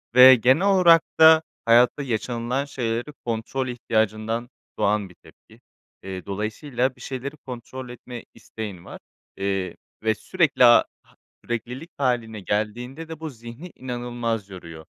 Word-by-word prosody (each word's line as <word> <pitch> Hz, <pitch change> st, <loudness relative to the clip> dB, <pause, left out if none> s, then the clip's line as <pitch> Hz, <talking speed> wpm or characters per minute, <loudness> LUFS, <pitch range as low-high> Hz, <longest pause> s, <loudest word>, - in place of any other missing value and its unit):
ve 130 Hz, +1 st, +10 dB
genel 130 Hz, -, +3 dB
olarak 175 Hz, -4 st, +6 dB, 0.2 s
da 160 Hz, 0 st, +8 dB, 0.2 s
hayatta 120 Hz, +4 st, +4 dB
yaşanılan 120 Hz, +2 st, -2 dB
şeyleri 120 Hz, +1 st, -3 dB
kontrol 120 Hz, +3 st, -2 dB
ihtiyacından 115 Hz, 0 st, -1 dB, 0.3 s
doğan 105 Hz, -2 st, +1 dB
bir 90 Hz, -, -17 dB
tepki. -, -, -20 dB, 0.4 s
Eee, 95 Hz, -2 st, -7 dB
dolayısıyla 120 Hz, +6 st, -2 dB
bir -, -, -18 dB
şeyleri 140 Hz, +3 st, -6 dB
kontrol 125 Hz, 0 st, -8 dB
etme 120 Hz, -1 st, -9 dB
isteğin 100 Hz, -6 st, -8 dB
var, -, -, -10 dB, 0.4 s
eee, 95 Hz, -1 st, -2 dB, 0.3 s
ve 110 Hz, -1 st, +2 dB
sürekli, 155 Hz, -, +2 dB
aaa, 120 Hz, 0 st, +7 dB, 0.2 s
ha -, -, -27 dB, 0.3 s
süreklilik 125 Hz, +7 st, -5 dB
hâline 120 Hz, -5 st, -1 dB
geldiğinde 120 Hz, -, -3 dB
de 160 Hz, -1 st, -7 dB
bu 160 Hz, -1 st, -5 dB
zihni 120 Hz, +7 st, -11 dB
inanılmaz 120 Hz, -4 st, -4 dB
yoruyor. 85 Hz, -4 st, -10 dB
120 Hz, 130 wpm, -24 LUFS, 110-130 Hz, 0.4 s, ve